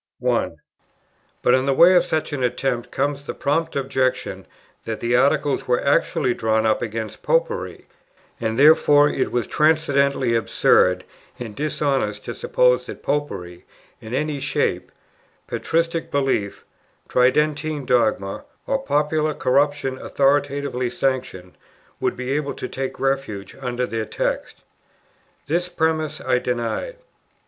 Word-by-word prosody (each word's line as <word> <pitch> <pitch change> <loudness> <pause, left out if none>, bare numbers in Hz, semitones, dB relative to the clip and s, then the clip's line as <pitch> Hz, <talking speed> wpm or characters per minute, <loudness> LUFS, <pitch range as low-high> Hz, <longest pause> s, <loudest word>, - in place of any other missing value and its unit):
1. - - -1 0.8
But 125 - +4
in 130 +1 +2
the 135 - +2
way 175 +5 +7
of 175 -1 +5
such 160 -3 -2
an 140 - -2
attempt 125 0 -1
comes 140 +1 -2
the - - -4
prompt 165 +3 -1
objection 130 -2 -1 0.4
that 110 -1 -4
the 120 +1 +1
Articles 140 +2 +2
were 125 -1 +2
actually 130 -2 +2
drawn 110 -1 0
up 110 -1 +2
against 110 -1 -5
"Popery," - - -1 0.5
and 110 -1 -2
therefore 145 0 +6
it 135 - -1
was 120 -2 0
transcendently 140 -5 +2
absurd 90 -5 +3 0.3
and 115 -5 -7
dishonest 140 -8 -1
to - - -4
suppose - - +2
that - - -9
Popery, 95 -12 -3 0.4
in 110 +3 -5
any 150 +1 -1
shape, 140 - -1 0.5
patristic 165 0 -1
belief, 135 -8 -1 0.4
Tridentine 150 +3 +1
dogma, 110 -6 +1 0.2
or 275 - 0
popular 155 - 0
corruption 140 0 +1
authoritatively 140 -2 0
sanctioned, 125 -9 -2 0.5
would - - -1
be 125 +1 -4
able 145 0 -1
to - - -5
take 135 0 -5
refuge 135 -8 -2
under 125 -1 -2
their 115 -2 -3
text. - - -3 0.8
This 175 +5 -1
premiss 160 -2 -1
I 125 - +2
denied. 125 - -3
135 Hz, 130 wpm, -22 LUFS, 120-150 Hz, 0.8 s, way